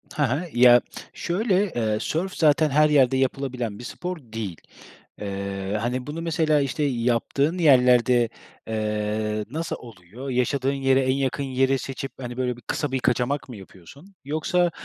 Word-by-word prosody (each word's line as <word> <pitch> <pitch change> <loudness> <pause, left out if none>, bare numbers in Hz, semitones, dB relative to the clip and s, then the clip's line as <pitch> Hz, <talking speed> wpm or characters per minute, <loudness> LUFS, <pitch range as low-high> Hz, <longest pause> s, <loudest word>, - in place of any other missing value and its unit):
Hı 150 - +1
hı. 140 +6 0
Ya, 120 0 +7 0.3
şöyle: 195 +1 0
Eee, 110 -3 0
sörf 180 - -2
zaten 155 -1 +3
her 150 +2 +4
yerde 135 -3 +4
yapılabilen 130 -5 -2
bir - - -8
spor 180 +7 -5
değil. 110 - -6 0.6
Eee, 100 0 -3
hani, 125 +3 -2
bunu 155 +3 -5
mesela, 160 -3 +2
işte, 140 +2 -1
yaptığın 130 +5 0
yerlerde, 125 -6 +4 0.4
eee, 105 -1 -2
nasıl 160 +3 -3
oluyor? 115 +4 -10
Yaşadığın 130 +2 0
yere 135 -1 +2
en 130 0 +2
yakın 135 0 -1
yeri 135 0 +1
seçip, 135 +1 -6
hani, 120 -1 -6
böyle 125 -2 -1
bir - - -14
kısa 145 +5 -3
bir 130 - 0
kaçamak 130 +3 0
mı 125 - -7
yapıyorsun 105 - -15
yoksa 170 +4 +1
130 Hz, 155 wpm, -24 LUFS, 115-150 Hz, 0.6 s, Ya